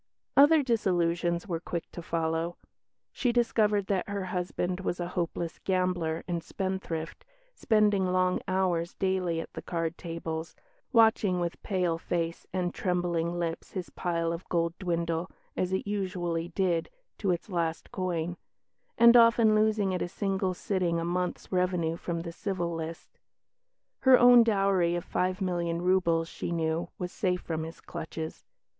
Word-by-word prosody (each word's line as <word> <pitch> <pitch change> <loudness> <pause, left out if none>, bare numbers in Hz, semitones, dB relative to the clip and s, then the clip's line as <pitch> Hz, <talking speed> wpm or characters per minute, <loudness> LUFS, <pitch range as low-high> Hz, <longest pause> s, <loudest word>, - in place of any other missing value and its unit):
Other 290 +2 +7
disillusions 175 -6 +1
were 170 -4 -2
quick 170 -1 -5
to 175 - -7
follow. 165 0 -1 0.5
She 245 - 0
discovered 215 -4 +2
that 195 -1 -1
her 200 -2 -2
husband 180 0 -2
was 180 -2 -2
a 175 0 -3
hopeless 170 -1 -3
gambler 180 -4 0
and 170 -2 -2
spendthrift, 185 -5 -4 0.3
spending 210 - +2
long 185 0 +2
hours 180 -3 0
daily 185 -3 0
at - - -7
the - - -6
card 165 -1 -3
tables, 165 -1 -5 0.4
watching 220 -6 +4
with 170 -1 -3
pale 180 -4 0
face 170 -1 -3
and 180 -1 -1
trembling 175 -2 -1
lips 170 -1 -3
his 185 -3 -5
pile 170 -2 -1
of 170 +2 -8
gold 170 -1 +1
dwindle 170 -2 -1 0.3
(as 185 0 -1
it 190 - -1
usually 180 -5 -2
did) 175 -2 0 0.3
to 200 - 0
its 175 -2 0
last 170 -4 -2
coin; 175 -2 -2 0.6
and 235 +1 +8
often 230 -2 +6
losing 215 -2 +2
at 180 - -2
a - - 0
single 190 0 -1
sitting 175 -3 0
a 165 - -2
month's 180 +1 -2
revenue 180 -3 +1
from 170 0 -3
the 170 0 -6
Civil 175 -1 -3
List. 165 0 -7 0.8
Her 260 -1 +7
own 245 0 +8
dowry 195 -5 +2
of 175 0 -3
five 185 +1 -1
million 170 -2 -1
roubles, 175 -2 +2
she 170 - -5
knew, 165 0 -1
was 180 0 -4
safe 180 -2 -1
from 160 -1 -3
his 165 +1 -7
clutches. 160 0 -6
180 Hz, 150 wpm, -29 LUFS, 170-190 Hz, 0.8 s, and